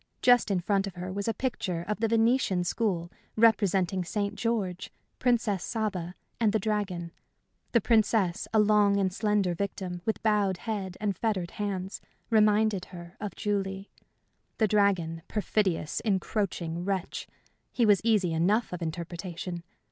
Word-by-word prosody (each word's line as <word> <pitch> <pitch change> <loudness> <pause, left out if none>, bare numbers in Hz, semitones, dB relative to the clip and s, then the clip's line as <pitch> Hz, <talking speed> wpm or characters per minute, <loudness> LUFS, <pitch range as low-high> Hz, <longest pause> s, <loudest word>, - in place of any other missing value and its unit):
Just 245 -3 +5
in 190 -3 +1
front 195 +2 +1
of 190 - -8
her 180 +1 -5
was 200 +2 -3
a - - +3
picture 205 -9 -2
of 210 +1 -2
the 225 - +2
Venetian 225 -4 +2
school 175 -3 -1 0.2
representing 200 -4 +3
St. 200 +4 -2
George, 200 -6 -2 0.3
Princess 225 -6 +1
Saba, 190 -6 -3 0.2
and 220 -3 +3
the - - +4
dragon. 190 -5 -2 0.6
The 235 - +4
princess, 215 -5 +2
a 220 - +2
long 210 -1 +4
and 190 -2 +1
slender 205 -3 +1
victim, 180 -1 -4
with 220 - -2
bowed 205 -4 +2
head 195 -5 -4
and 205 -2 -1
fettered 190 -5 -1
hands, 195 -2 -4 0.3
reminded 210 -3 +3
her 175 -1 -11
of 205 -4 -4
Julie. 195 -2 -2 0.7
The 220 - +3
dragon 185 -6 +2
perfidious, 195 -6 0
encroaching 190 -5 -1
wretch! 190 -1 -3 0.4
he 240 - +2
was 205 -3 +5
easy 210 -7 +2
enough 195 +7 +1
of 180 - -5
interpretation. 170 +1 -5
200 Hz, 145 wpm, -28 LUFS, 180-215 Hz, 0.7 s, Just